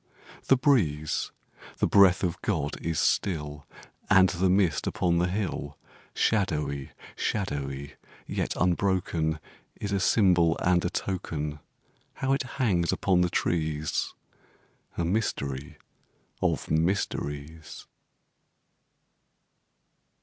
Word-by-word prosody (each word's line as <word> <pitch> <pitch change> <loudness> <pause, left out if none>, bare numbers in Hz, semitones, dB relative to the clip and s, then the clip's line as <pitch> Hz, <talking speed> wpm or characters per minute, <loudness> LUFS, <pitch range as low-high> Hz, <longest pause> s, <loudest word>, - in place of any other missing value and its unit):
The 135 - +6
breeze 85 - +1 0.5
the - - +2
breath 100 -2 +5
of 90 -1 -1
God 75 -9 -1
is 80 -1 -1
still 75 -5 -1 0.4
And 95 -1 +6
the 90 +1 +1
mist 95 -4 +2
upon 85 -1 +1
the 90 - +2
hill 90 -7 -3 0.4
Shadowy 75 -10 0 0.3
shadowy 70 -8 -3 0.3
yet - - -2
unbroken, 90 -4 0 0.4
Is 100 - -3
a 100 - +1
symbol 90 -5 +4
and 90 -1 +2
a 90 - 0
token 75 -6 -3 0.6
How 135 0 0
it 135 - +1 0.2
hangs 95 -10 +2
upon 90 -2 +2
the 90 - +2
trees, 80 -3 -1 0.8
A 85 - 0
mystery 75 -6 -2 0.6
of - - 0
mysteries! 80 -3 -2
85 Hz, 100 wpm, -27 LUFS, 75-95 Hz, 0.8 s, The